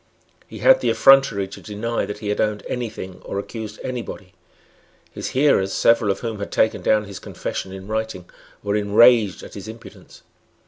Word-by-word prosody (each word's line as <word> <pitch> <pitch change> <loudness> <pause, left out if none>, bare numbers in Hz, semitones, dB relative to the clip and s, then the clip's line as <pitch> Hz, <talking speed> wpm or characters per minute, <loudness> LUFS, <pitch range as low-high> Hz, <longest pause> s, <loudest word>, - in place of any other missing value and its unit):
He - - -10
had - - +7
the - - +1
effrontery 135 -8 +5
to - - -10
deny 115 +2 -3
that 105 - -5
he 105 0 -5
had 105 - 0
owned 105 -1 -1
any 125 -2 -3
thing 95 -4 -9
or - - -5
accused 110 +1 -6
any 125 -1 -3
body. 95 -5 -10 0.8
His - - -5
hearers, 130 -9 +3
several 115 -2 +3
of 95 - -1
whom 115 -3 -4
had 100 - -5
taken 110 - +1
down 105 -1 +2
his 100 -2 -9
confession 95 - -5
in 95 0 -9
writing, 110 -4 -4 0.4
were 100 0 -1
enraged 105 0 +4
at - - -11
his 100 +2 -8
impudence. 110 +1 -13
105 Hz, 185 wpm, -22 LUFS, 100-115 Hz, 0.8 s, had